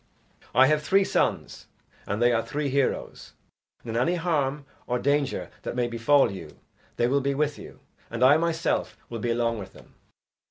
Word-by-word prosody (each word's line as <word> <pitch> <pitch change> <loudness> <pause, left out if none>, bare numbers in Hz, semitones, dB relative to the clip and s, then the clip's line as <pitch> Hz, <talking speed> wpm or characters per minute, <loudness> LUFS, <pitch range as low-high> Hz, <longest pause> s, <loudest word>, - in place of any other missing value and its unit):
"I 130 - +7
have 150 +2 +2
three 195 +6 +3
sons, - - -1 0.4
and 105 +2 -2
they 120 0 +4
are 115 - +2
three 150 +2 -3
heroes, 140 0 -2 0.5
and 115 - -6
in 120 - +2
any 170 +8 +1
harm 150 -5 -1 0.2
or 125 - 0
danger 140 +1 0
that - - -5
may 125 -1 +1
befall 120 +4 +3
you, 85 -6 -9 0.4
they 120 - +1
will 140 +3 +2
be 140 +1 -1
with 150 0 -1
you, - - -12 0.3
and 120 +2 -2
I 140 +4 +7
myself 165 0 -1
will 115 - -5
be 120 - -2
along 115 -1 0
with 95 -1 -9
them." - - -17
135 Hz, 185 wpm, -26 LUFS, 120-150 Hz, 0.5 s, I